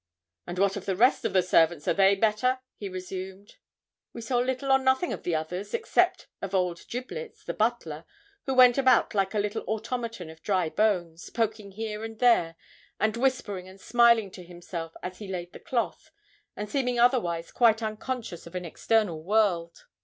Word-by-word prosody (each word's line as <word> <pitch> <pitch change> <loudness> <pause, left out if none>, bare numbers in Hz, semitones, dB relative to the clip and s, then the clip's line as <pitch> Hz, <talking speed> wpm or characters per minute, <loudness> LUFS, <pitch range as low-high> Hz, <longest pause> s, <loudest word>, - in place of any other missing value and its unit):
'And 175 +1 -5
what 195 +1 +2
of 200 - -8
the 190 - 0
rest 245 +7 +3
of - - -1
the 185 -1 +4
servants, 165 -3 +3
are - - +4
they 195 0 +5
better?' 220 +5 +2 0.2
he 200 - -6
resumed. 190 +2 -7 0.6
We 235 - -7
saw 240 +2 0
little 260 +2 -1
or 265 - +6
nothing 265 +6 +1
of - - -6
the 175 - -1
others, 180 - -3
except 460 -1 +1
of 195 0 -3
old 180 -2 0
'Giblets,' 260 - -7
the - - -3
butler, 190 -9 -1 0.4
who 265 - 0
went 250 0 +7
about 260 -1 +4
like 195 0 0
a - - +1
little 205 +1 -1
automaton 225 -5 -4
of 160 0 -16
dry 185 -4 0
bones, 175 -5 0
poking 215 -3 -2
here 215 +1 -5
and 225 0 -7
there, 220 -9 +3 0.4
and 215 0 +1
whispering 235 -7 -1
and 190 +1 -14
smiling 235 -3 +4
to 180 - -10
himself 175 -1 -7
as 180 0 -6
he 210 - -7
laid 180 -2 -5
the - - -10
cloth; 240 -3 -3 0.5
and 210 - -5
seeming 250 -1 -1
otherwise 180 -10 +2
quite 230 -2 +3
unconscious 215 -4 -5
of 170 - -12
an 180 -1 -4
external 185 -1 0
world. 180 - 0
205 Hz, 185 wpm, -27 LUFS, 180-235 Hz, 0.6 s, went